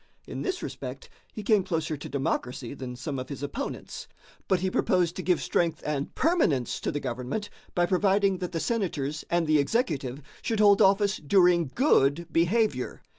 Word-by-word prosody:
In - - -6
this 375 -1 -2
respect 475 - -7 0.2
he 215 - -7
came 210 -2 +3
closer 160 -3 -2
to 145 - -8
democracy 130 -2 -2
than 130 -3 -7
some 135 +2 -4
of 130 - -6
his 140 -1 -6
opponents, 240 - -5 0.4
but 190 -2 +2
he 190 0 0
proposed 180 -3 +1
to - - -4
give 180 -2 +2
strength 170 -2 0
and 145 -2 -3
permanence 175 - +1
to - - -2
the 145 - -2
government 130 - -4 0.2
by 175 - +3
providing 195 +1 +2
that 180 - -4
the 165 - -2
Senators 155 - -2
and 170 -1 +2
the 155 -1 +3
executive 140 - -1 0.2
should 225 -2 -1
hold 205 -1 +6
office 200 +1 +4
during 175 -1 +3
good 170 - +3
behavior. 170 - +1
170 Hz, 175 wpm, -27 LUFS, 140-200 Hz, 0.4 s, hold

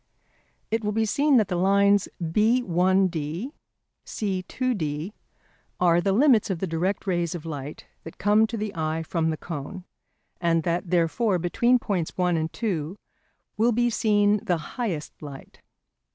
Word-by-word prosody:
It 225 0 0
will 210 0 -1
be 225 +1 +1
seen 280 +5 +3
that 215 -4 +3
the 180 - -2
lines 200 +2 +3
B1D, 185 - +1 0.5
C2D 190 - -3 0.7
are 175 -1 +4
the 195 +2 +1
limits 230 0 +4
of 190 - -1
the 190 - -2
direct 180 +4 -2
rays 175 -3 -1
of 165 -2 -7
light 145 -2 -7 0.2
that 160 - -10
come 210 +2 +3
to 230 - -5
the 210 -1 -3
eye 160 -1 -2
from 160 0 -1
the 155 - -2
cone, 165 +3 -7 0.6
and 165 -2 +1
that 170 +2 -1
therefore 180 +4 +1
between 235 +9 +2
points 190 -8 -3
1 180 -1 +2
and 160 0 -1
2 180 -5 -3 0.6
will 230 +3 +3
be 240 +1 +1
seen 210 -1 +3
the 180 -6 +1
highest 175 - -5
light. 140 -3 -11
185 Hz, 150 wpm, -25 LUFS, 165-215 Hz, 0.7 s, are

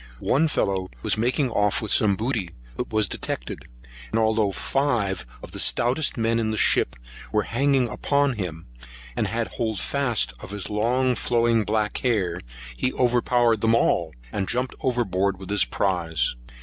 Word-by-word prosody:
One 155 +5 +2
fellow 95 -9 -1
was 110 - +2
making 125 +4 0
off 105 -2 +2
with 110 - -3
some 105 -3 +5
booty, 110 -4 -2 0.3
but - - -4
was 110 -2 +2
detected; - - -5 0.4
and - - -1
although 110 -2 +2
five 100 - -1 0.2
of - - -9
the - - -6
stoutest 130 +5 +2
men 115 0 +1
in 110 -1 0
the 110 - -2
ship - - +3 0.4
were 105 - +2
hanging 135 +1 +1
upon 140 +3 +1
him, 90 -7 -5 0.5
and 105 - 0
had 115 +3 -2 0.3
fast 120 - +1
hold - - -22
of 90 - -9
his 100 +1 -5
long 125 +5 +1
flowing 115 -1 +2
black 105 0 0
hair, 95 -9 0 0.3
he 125 - 0
overpowered 120 -2 +2
them 115 0 +3
all, 85 - +1 0.2
and 95 -2 -2
jumped 125 +1 -1
overboard 100 -7 0
with 95 +1 -8
his 105 -2 +4
prize. 90 -5 0
110 Hz, 160 wpm, -24 LUFS, 100-125 Hz, 0.5 s, some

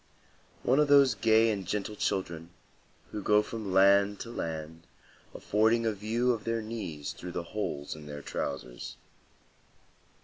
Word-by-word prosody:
One 130 +4 +3
of 150 - +4
those 140 -3 +6
gay 110 0 +4
and 100 -3 -3
gentle 105 +2 -2
children, 85 -5 -2 0.6
who 105 - -4
go 105 +2 +4
from 110 -4 -5
land 100 +1 +5
to 115 - -7
land 80 -4 -5 0.5
affording 110 +2 +2
a 110 - +2
view 115 +5 0
of 115 -3 -3
their 115 -1 -1
knees 85 -10 -5
through 90 0 -8
the 85 - -3
holes 75 -10 -3
in 75 -1 -11
their 75 -1 -7
trousers. - - -5
105 Hz, 145 wpm, -30 LUFS, 85-115 Hz, 0.6 s, those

